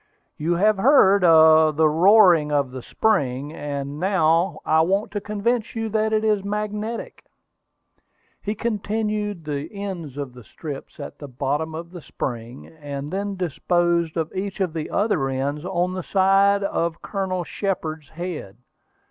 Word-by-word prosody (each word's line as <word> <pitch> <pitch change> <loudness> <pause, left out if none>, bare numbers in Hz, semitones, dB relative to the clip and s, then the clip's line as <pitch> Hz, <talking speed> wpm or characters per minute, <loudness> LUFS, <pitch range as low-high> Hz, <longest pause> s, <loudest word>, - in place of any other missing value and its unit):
"You 165 +3 -1
have 210 +4 +3
heard 200 -4 +5
the 160 -2 +6
roaring 175 -1 +5
of 140 -3 +1
the 130 0 -7
spring, 140 - 0
and 145 -1 -5
now 170 -2 +2
I 160 0 +4
want 195 +6 0
to 205 - -3
convince 215 +3 -1
you 225 -1 -2
that 220 +1 0
it 215 0 +1
is 210 -3 +1
magnetic." 210 +2 -4 1.2
He 210 +1 -3
placed 210 -3 -2
the 150 +1 -4
ends 185 -9 -6
of 140 -3 -5
the 125 -1 -13
strips 145 +5 -9
at 140 - -8
the 145 - -8
bottom 145 +5 -2
of 170 +1 -7
the 175 -2 -9
spring, 120 -2 -6
and 145 -1 -7
then 200 +1 -2
disposed 175 -1 0
of 160 -1 -2
each 195 +1 -4
of 185 -4 -1
the 160 -2 -4
other 195 -10 0
ends 140 +3 -2
on 180 -1 -1
the 185 - -3
sides 195 +2 +3
of 170 -4 -2
Colonel 190 -3 -2
Shepard's 160 -5 -4
head. 165 - -6
175 Hz, 150 wpm, -23 LUFS, 150-200 Hz, 1.2 s, the